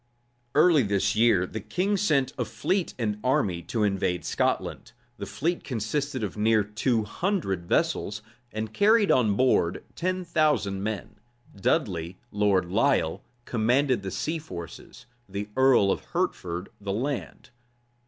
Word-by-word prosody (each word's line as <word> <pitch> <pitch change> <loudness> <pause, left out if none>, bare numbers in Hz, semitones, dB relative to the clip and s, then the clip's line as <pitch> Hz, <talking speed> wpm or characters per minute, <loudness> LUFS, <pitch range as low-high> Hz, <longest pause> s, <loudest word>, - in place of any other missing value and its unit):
Early 155 0 +6
this 100 -1 +1
year 110 -5 +4
the 110 - -6
king 190 - 0
sent 140 -9 +1
a 125 - -1
fleet 185 - -1
and 105 -4 -2
army 130 - +1
to 110 -3 0
invade 95 -3 0
Scotland. - - -1 0.2
The - - -6
fleet 170 +4 -2
consisted 130 +2 -2
of 105 - -3
near 110 0 +3
two 110 +2 0
hundred 105 - -2
vessels, 105 +4 0 0.3
and 110 0 -4
carried 210 - +4
on 110 -5 +3
board 115 -8 +2
ten 185 +1 -2
thousand 150 - +1
men. 105 +1 -4 0.4
Dudley, 95 - -1
Lord 100 -3 +2
Lisle, 100 - +1 0.2
commanded 125 +2 +2
the 95 - -4
sea 160 - -2
forces; 90 - -10 0.2
the 100 +2 -5
earl 130 -7 +5
of - - -2
Hertford 85 +1 -2
the 100 -1 -3
land. 130 +5 -4
110 Hz, 135 wpm, -26 LUFS, 100-140 Hz, 0.4 s, Early